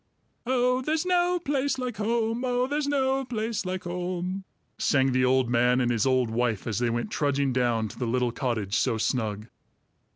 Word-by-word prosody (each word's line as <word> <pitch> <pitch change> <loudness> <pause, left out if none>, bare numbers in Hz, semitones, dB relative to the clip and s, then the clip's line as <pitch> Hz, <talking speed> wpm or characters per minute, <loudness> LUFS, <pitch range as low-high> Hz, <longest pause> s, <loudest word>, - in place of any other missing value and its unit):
"Oh, 250 0 +2
there's 310 +5 -1
no 360 0 +2
place 285 -4 -1
like 250 -4 -4
home! 225 +2 0
Oh, 250 0 +1
there's 290 +2 -1
no 270 -1 +1
place 225 -5 -3
like 185 0 -3
home!" 180 +2 -3 0.3
sang 135 -2 +2
the 130 0 +2
old 130 0 +3
man 125 +1 +3
and 120 -1 +1
his 115 +1 +1
old 130 -3 +2
wife, 115 -3 0
as 110 -2 -2
they 120 -1 +1
went 120 +1 -2
trudging 140 -2 0
down 120 -3 +1
to - - -12
the 125 - -1
little 125 +1 +1
cottage 115 -6 -2
so 115 - +1
snug. 110 -3 -1
150 Hz, 185 wpm, -27 LUFS, -, 0.3 s, old